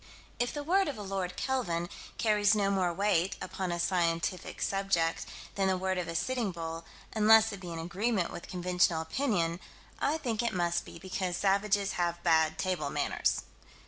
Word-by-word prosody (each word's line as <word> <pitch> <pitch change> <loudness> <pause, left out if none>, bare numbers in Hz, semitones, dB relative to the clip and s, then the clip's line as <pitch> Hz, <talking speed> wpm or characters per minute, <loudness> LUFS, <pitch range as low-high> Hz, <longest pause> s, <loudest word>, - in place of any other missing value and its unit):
If 245 0 +1
the 290 - -4
word 380 +5 +3
of 285 - -3
a 210 - -6
Lord 190 -2 -3
Kelvin 175 -11 -1 0.3
carries 210 -1 +3
no 200 -1 +2
more 185 -3 +2
weight, 190 -1 +1
upon 175 -2 -3
scientific 170 0 0
subjects, 195 -4 0 0.3
than 195 -1 +1
the 190 -1 +2
word 190 0 -1
of 175 - -3
a 165 - -4
Sitting 240 +2 0
Bull, 165 -1 -5 0.3
unless 220 0 +6
it 200 - -7
be 180 -2 -7
in 165 - -5
agreement 185 +4 -1
with - - -8
conventional 180 -2 +1
opinion 170 - 0 0.4
I 305 - +1
think 245 -8 -1
it 235 -5 -1
must 175 -1 +1
be - - -10
because 185 0 -3
savages 200 0 +2
have 175 0 -1
bad 160 -1 +3
table 180 -6 -1
manners. - - 0
185 Hz, 175 wpm, -31 LUFS, 170-210 Hz, 0.4 s, unless